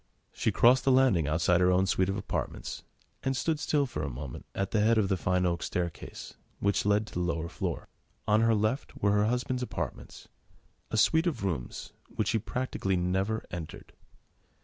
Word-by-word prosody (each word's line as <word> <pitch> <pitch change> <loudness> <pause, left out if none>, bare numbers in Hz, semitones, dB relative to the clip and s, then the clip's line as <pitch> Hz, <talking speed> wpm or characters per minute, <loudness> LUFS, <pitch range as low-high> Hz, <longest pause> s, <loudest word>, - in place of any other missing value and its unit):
She - - 0
crossed 125 +2 +5
the 135 - +3
landing 130 - +4
outside 85 +3 +2
her 90 0 +5
own 90 +1 +3
suite 95 0 +1
of 95 - -1
apartments, 95 - -4 0.4
and 135 -1 -1
stood 155 +2 0
still 145 -2 +1
for 120 - -5
a 75 - -2
moment 65 0 -7
at 95 0 -2
the 110 - +2
head 115 +2 +4
of 100 -3 +2
the 95 - +2
fine 90 0 +1
oak 85 -1 0
staircase, 85 -2 -4 0.3
which 100 0 +1
led 105 +1 +3
to - - -13
the - - -2
lower 85 -2 -1
floor. - - -4 0.4
On 105 +1 +4
her 115 0 +4
left 110 +6 -1
were 100 - +2
her 105 +1 +3
husband's 125 +2 -1
apartments, 125 - -5 0.6
a 110 - -2
suite 160 - +4
of 155 - -2
rooms 80 -11 -4 0.2
which - - -1
she 115 - +2
practically 115 -4 -2
never 95 +5 -1
entered. 85 -3 -8
100 Hz, 190 wpm, -29 LUFS, 90-120 Hz, 0.6 s, crossed